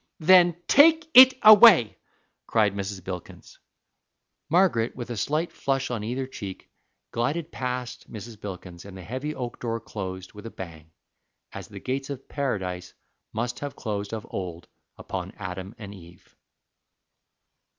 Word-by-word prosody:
"Then 175 0 +5
take 320 +3 +6
it 260 +1 +10
away!" 215 - +8 0.5
cried 105 -3 +2
Mrs. 100 -1 -5
Bilkins. 90 -1 -9 0.9
Margaret, 160 -9 +2
with 120 -1 -7
a - - -3
slight 155 +10 -1
flush 135 -2 -2
on 115 -4 -3
either 125 +4 -3
cheek, 100 -7 -9 0.4
glided 150 +8 -2
past 125 -1 -5
Mrs. 110 0 -9
Bilkins, 90 -3 -8
and 100 -1 -11
the 95 - -9
heavy 130 - -5
oak 120 -2 -6
door 115 -1 -3
closed 95 -4 -7
with 105 +2 -10
a - - -6
bang, 80 -6 -10 0.6
as - - -8
the - - -10
gates 135 +2 -4
of 135 -2 -7
Paradise 95 -10 -4 0.4
must 120 +3 -3
have 145 -1 -6
closed 100 -2 -4
of 110 -2 -5
old 90 -3 -6 0.3
upon - - -6
Adam 95 +2 -7
and 100 -2 -9
Eve. 85 -2 -16
115 Hz, 140 wpm, -25 LUFS, 95-140 Hz, 0.9 s, it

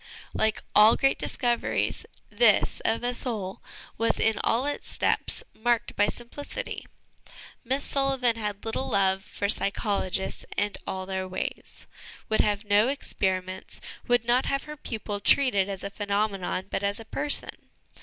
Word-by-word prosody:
Like 220 -1 0
all 215 +2 +7
great 270 0 +2
discoveries, 240 -3 -1 0.2
this, - - +4
of 225 +2 0
a 245 0 0
soul, 215 -7 -4 0.4
was, 230 - +1
in 225 -1 +2
all 240 +4 +2
its 290 - -3
steps, - - +2
marked 235 +1 0
by 205 - +3
simplicity. 290 - -5 0.8
Miss 265 +3 0
Sullivan 270 -4 +1
had 210 -2 -4
little 225 +4 -2
love 190 -1 +2
for 200 - -3
psychologists 200 -2 +1
and 205 0 0
all 190 0 -3
their 190 0 -3
ways; 185 - -6 0.4
would 220 - +3
have 205 0 0
no 205 +2 +4
experiments; 190 -9 -2 0.3
would 245 -2 +2
not 245 +2 +2
have 275 0 -1
her 300 0 -8
pupil 215 -7 -5
treated 200 -4 +4
as 195 -1 -4
a 200 - -4
phenomenon, 200 -2 -1
but - - -1
as 200 +2 -1
a 225 - -9
person. 290 +5 -2
220 Hz, 145 wpm, -27 LUFS, 200-245 Hz, 0.8 s, all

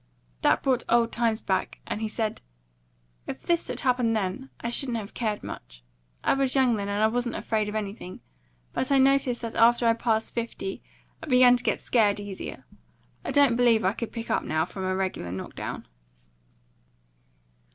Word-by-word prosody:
That - - +3
brought 260 -3 +2
the - - +1
old 235 -1 +3
times 230 -2 0
back, 190 - -1
and 210 - -4
he 220 - -1
said: 215 0 -3 0.9
"If 130 - -6
this 340 -1 +1
had - - -2
happened 245 -4 +2
then, 215 +6 -2
I 235 - -3
shouldn't 245 -2 +2
have 210 -1 -7
cared 215 -3 -2
much. - - -9 0.4
I - - +3
was 270 -1 +1
young 255 -3 +4
then, 200 -1 -3
and 205 +1 0
I - - +6
wasn't 240 +1 -1
afraid 215 -2 -1
of 210 - -6
anything. 200 -3 -5 0.5
But 260 - -1
I 275 - +5
noticed 265 -2 +3
that 230 - -4
after 235 +1 +4
I 230 - +5
passed 225 -1 -1
fifty 230 -4 -4 0.4
I 320 - -8
began 250 -2 +6
to 245 - -2
get - - 0
scared 210 -4 +2
easier. 205 -2 -7 0.6
I - - -5
don't 280 -5 +4
believe 235 -4 +4
I 190 - +3
could 230 0 -5
pick 230 -1 -5
up, - - +2
now, 155 +1 0
from 190 -1 -6
a 185 0 0
regular 185 - -2
knock 95 +1 -6
down." - - -6
230 Hz, 190 wpm, -26 LUFS, 205-245 Hz, 0.9 s, I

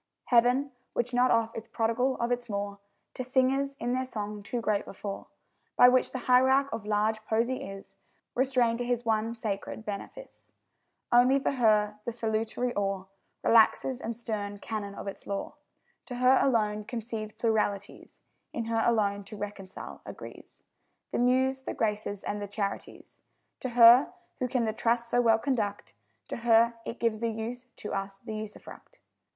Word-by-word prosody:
Heaven, 250 +3 +3 0.2
which 245 +1 -1
not 250 +1 +4
oft 230 0 +2
is 225 0 -6
prodigal 230 +3 0
of 235 +1 -1
its 245 -1 -2
more 200 -1 -3 0.3
To 255 - -4
singers, 270 +2 +1
in 245 - -1
their 255 0 -1
song 210 -3 -5
too 220 +4 -3
great 215 -3 0
before 195 0 -7 0.5
By 245 - +8
which 255 0 +2
the - - -3
hierarch 265 +2 +4
of 210 -2 -5
large 215 +1 +1
poesy 230 +4 0
is 195 0 -11 0.4
Restrained 250 -3 +2
to - - -1
his 240 -1 -1
one 225 +1 0
sacred 215 0 -4
benefice 210 - -8 0.6
Only 245 +3 +6
for 275 - 0
her 210 -5 +2
the 235 - -3
salutary 225 +2 -1
awe 195 -2 -1 0.4
Relaxes 235 +3 +4
and 230 0 -4
stern 210 -4 -4
canon 205 -1 -5
of - - -7
its 195 - -7
law; 200 -1 -3 0.5
To 245 - -5
her 255 +2 +5
alone 215 -5 +1
concedes 225 -2 -5
pluralities, 210 -3 -2 0.3
In 230 - -3
her 225 0 0
alone 205 -3 +1
to 205 +2 -9
reconcile 200 -2 -7
agrees - - -11 0.5
The - - -1
Muse, 260 +2 +2
the - - -5
Graces, 210 -2 -2
and 205 0 -3
the 205 - -4
Charities; 200 -1 -5 0.4
To 260 - -3
her, 240 +5 +8 0.3
who 255 - 0
can 245 -1 0
the 220 - -1
trust 235 +1 0
so 245 - +3
well 225 -2 +5
conduct, 220 -5 -2 0.4
To - - -3
her 235 0 +4
it 235 - -5
gives 230 -2 +1
the 230 0 0
use, 230 +3 -5
to 210 - -6
us 195 0 -3
the 220 +2 -8
usufruct. 215 - -9
230 Hz, 165 wpm, -29 LUFS, 210-245 Hz, 0.6 s, By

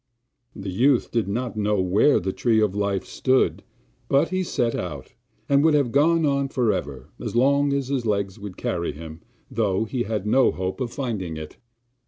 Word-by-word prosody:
The 100 -1 -5
youth 125 +6 +2
did 115 -4 0
not 120 +4 -3
know 105 -1 0
where 95 +10 +3
the 95 +1 -3
Tree 115 -3 +2
of 105 -3 +2
Life 100 -2 -1
stood, 130 0 +1 0.5
but 140 - +3
he 185 0 -1
set 120 -9 -1
out, 75 -7 -5 0.3
and 140 0 +3
would 160 -1 +4
have 140 -5 +2
gone 160 +4 +3
on 140 -1 +1
for 120 -5 +1
ever, 70 -5 -6
as 115 -2 -5
long 140 +3 +3
as 140 -2 -1
his 135 -3 -1
legs 100 0 -1
would 100 -2 -8
carry 85 -1 -2
him, 80 +1 -10 0.3
though 105 -2 0
he 125 +2 -3
had 105 -3 -2
no 130 +5 +4
hope 95 +3 -4
of 120 -2 -2
finding 105 - -4
it. 80 -1 -9
110 Hz, 190 wpm, -24 LUFS, 95-135 Hz, 0.5 s, would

